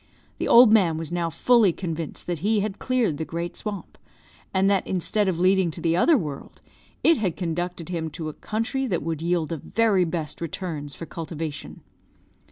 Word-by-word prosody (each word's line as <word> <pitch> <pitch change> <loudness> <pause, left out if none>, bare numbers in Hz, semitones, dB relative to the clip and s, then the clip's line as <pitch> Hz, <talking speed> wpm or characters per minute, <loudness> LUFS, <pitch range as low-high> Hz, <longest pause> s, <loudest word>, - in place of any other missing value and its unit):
The - - -1
old 235 -2 +8
man 180 -8 +4
was 165 0 -5
now 175 -1 -1
fully 225 +5 +4
convinced 165 -3 -5
that 175 -3 -3
he 210 +4 +1
had 210 -1 -3
cleared 245 - 0
the 160 - -2
great 170 +2 -4
swamp; 205 -3 -6 0.5
and 190 0 +2
that, 200 -1 +2
instead 195 +3 0
of 175 -3 0
leading 185 0 +3
to 160 - -7
the 165 -1 +1
other 305 - +5
world, 150 - -6 0.4
it 330 -5 +5
had 185 -7 -1
conducted 175 0 -3
him 165 -3 -3
to 160 -3 -4
a 155 - -5
country 235 - -2
that 175 - -1
would 160 -1 -3
yield 170 -2 0
the 165 - -3
very 200 +3 +2
best 160 -2 -4
returns 160 -4 -5
for 165 - -7
cultivation. 160 -2 -6
175 Hz, 185 wpm, -25 LUFS, 165-200 Hz, 0.5 s, old